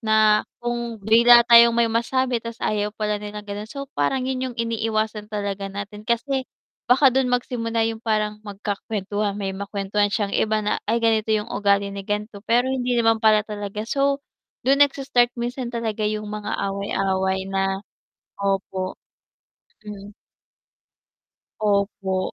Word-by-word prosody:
na 215 -1 +4 0.2
kung 240 -1 -3
bigla 235 +2 +7
tayong 235 -1 +7
may 235 - +4
masabi, 235 +2 0
tas 230 0 -7
ayaw 210 -1 0
pala 210 -1 -1
nila 210 0 -7
ganon, 205 +1 -6
so 275 +3 -6
parang 255 - 0
yun 260 0 -2
yung 245 - -10
iniiwasan 220 -2 -2
talaga 200 -2 -3
natin 200 +1 -7
kasi 260 +3 -1 0.4
baka 260 +1 +5
dun 265 -1 +2
magsimula 235 -2 0
yung 225 0 -3
parang 215 -2 -1
magkaka-kwentuhan, 205 0 -3
may 195 -2 -3
makwentuhan 200 +1 -1
siyang 205 -1 -1
iba 215 -1 +1
na 210 - 0
ay 225 - +2
ganito 220 -1 +2
yung 215 +1 0
ugali 200 0 +1
ni 200 - -5
ganto 210 0 -3
pero 240 +2 +4
hindi 250 -2 0
naman 225 -1 +3
pala 215 -1 +4
talaga. 210 0 -5
So, 275 +3 0 0.4
dun 275 +2 +3
nagsa-start 270 -4 +2
minsan 240 +1 -3
talaga 230 -2 -3
yung 215 0 -3
mga 210 0 -3
away-away 190 -1 -1
na 195 0 0 0.7
opo, 190 -1 -2 0.8
mm. 205 -1 -9 1.5
Opo. 200 -2 0
215 Hz, 140 wpm, -23 LUFS, 205-235 Hz, 1.5 s, bigla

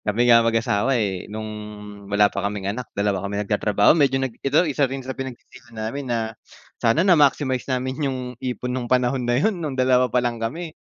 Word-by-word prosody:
Kami 110 +4 +1
nga 115 -1 +7
mag-asawa 115 +2 +1
eh, 95 -5 -2
nung 110 +1 -5 0.6
wala 100 +1 +4
pa 100 - -2
kaming 100 0 -3
anak, 125 +1 -7
dalawa 100 -2 0
kami 100 0 -4
nagtatrabaho, 105 +1 +3
medyo 140 -4 +3
nag 135 -3 -2
ito 145 +6 +3
isa 145 -3 +1
rin 135 -1 -6
sa 130 - -4
pinag 130 -2 -6
sisihan 115 -2 -17
namin 125 +5 -4
na, 115 -1 -1 0.5
sana 120 +10 +3
na 190 - +6
maximize 140 -4 +2
namin 130 +2 -1
yung 130 -1 -3 0.2
ipon 125 0 -3
nung 125 -2 -4
panahon 125 +1 +2
na 120 - +3
yun 185 +5 0
nung 145 -5 -4
dalawa 130 0 +3
pa - - 0
lang 120 -2 -1
kami. 155 +8 -4
125 Hz, 205 wpm, -22 LUFS, 110-135 Hz, 0.6 s, nga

